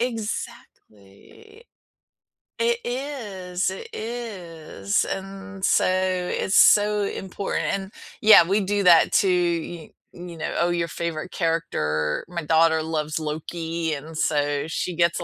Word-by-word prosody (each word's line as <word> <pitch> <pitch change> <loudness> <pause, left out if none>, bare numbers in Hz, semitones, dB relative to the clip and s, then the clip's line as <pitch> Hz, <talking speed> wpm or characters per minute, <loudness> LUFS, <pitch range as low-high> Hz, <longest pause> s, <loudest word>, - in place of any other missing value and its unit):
Exactly. 225 - -7 0.9
It 470 0 +1
is, 210 -9 -3
it 190 - -7
is, 180 - -3
and 195 0 -7
so - - +3
it's 185 0 0
so 210 0 +5
important, 195 0 -3
and, 195 0 -4 0.3
yeah, 215 -4 +9
we 195 +5 +1
do 200 +1 0
that 170 -2 +6
too, 195 - +4
y 170 -2 -1 0.2
you 175 -1 -10
know, 160 - -4
oh, 170 - +2
your 170 -1 -1
favorite 170 +1 -4
character 75 - -1
my 170 -2 -5
daughter 160 +1 +3
loves 155 -1 -2
Loki, 160 +1 -3
and 155 +2 -7
so 145 -2 0
she 175 +2 -3
gets 170 0 +2
a - - -4
175 Hz, 125 wpm, -24 LUFS, 160-200 Hz, 0.9 s, yeah